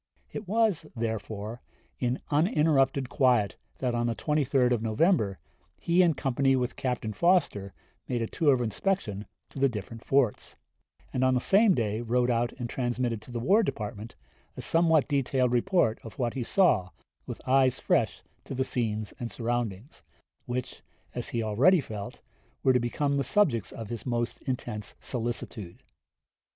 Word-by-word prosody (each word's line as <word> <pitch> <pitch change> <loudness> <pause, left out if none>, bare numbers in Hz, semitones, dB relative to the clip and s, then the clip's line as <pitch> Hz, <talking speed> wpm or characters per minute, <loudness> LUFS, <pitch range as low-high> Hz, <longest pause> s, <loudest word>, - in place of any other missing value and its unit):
It 210 - -6
was, 210 -6 +1
therefore, 110 0 -4 0.4
in 125 0 -1
uninterrupted 145 -4 +2
quiet 125 -7 +2 0.2
that 125 -2 -1
on 120 0 0
the 115 - -1
23d 140 -4 +1
of 120 -3 +1
November 110 - +2 0.4
he 170 +2 +3
in 170 -4 +4
company 135 0 +1
with 125 -1 -1
Captain 125 -4 -2
Foster 165 - +2 0.4
made 120 -2 -1
a - - -2
tour 150 +3 +2
of 125 - -2
inspection 110 - -2 0.2
to - - -8
the 135 0 +4
different 115 0 -7
forts, 135 -6 +1 0.6
and 130 - 0
on 130 0 +3
the - - +3
same 200 - +4
day 110 -1 -1
wrote 120 +1 +1
out 120 0 +1
and 120 -2 -5
transmitted 120 -2 -2
to 115 - -12
the 120 - -3
War 195 - +4
Department 105 - -4 0.4
a - - -4
somewhat 165 -3 +3
detailed 130 -3 +1
report 125 - +2
of 115 - -10
what 120 -4 -1
he 135 - -3
saw 120 - +3 0.4
with - - -6
eyes 130 -1 +3
fresh 120 - +1 0.2
to - - -6
the 130 - +1
scenes 110 -5 -2
and 120 -2 -4
surroundings, 120 0 -3 0.5
which, 125 0 -4 0.3
as - - -3
he 115 -1 -1
already 130 - +4
felt, 105 -7 -7 0.4
were 130 - +5
to 125 - +4
become 140 +4 0
the 140 - +1
subjects 135 - +1
of 115 -3 -8
his 120 +2 -5
most 120 -1 -2
intense 120 -5 -4
solicitude. 115 -6 -4
125 Hz, 160 wpm, -28 LUFS, 115-140 Hz, 0.6 s, were